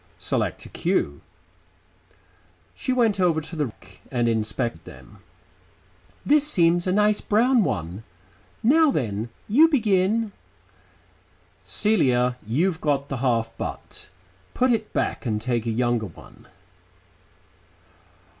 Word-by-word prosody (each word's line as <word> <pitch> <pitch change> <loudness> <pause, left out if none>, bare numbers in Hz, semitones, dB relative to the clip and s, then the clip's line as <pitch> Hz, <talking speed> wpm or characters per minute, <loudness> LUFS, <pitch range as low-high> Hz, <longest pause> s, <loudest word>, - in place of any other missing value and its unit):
"Select - - -2
a - - -11
cue." - - -1 1.5
She 260 - -3
went 230 -6 +2
over 175 -4 +3
to 160 +2 -8
the 150 -3 0
rack 95 -3 -16
and 120 -2 0
inspected 110 -4 -2
them. 105 - -14 1.1
"This 295 0 +4
seems 175 - +2
a - - +2
nice 210 +1 +2
brown 235 +2 +3
one. 90 - -3 0.6
Now 310 +7 +5
then, 115 - -2 0.2
you 290 +10 +6
begin." 220 - +1 1.3
"Celia, 125 - +1
you've 160 +9 0
got 140 -2 0
the 135 - -3
half 115 -3 0
butt. - - -7 0.5
Put 255 0 +3
it 220 -2 -1
back - - -2
and 105 -2 0
take 120 0 -2
a - - +1
younger 120 -1 0
one." 85 - -16
155 Hz, 115 wpm, -24 LUFS, -, 1.5 s, you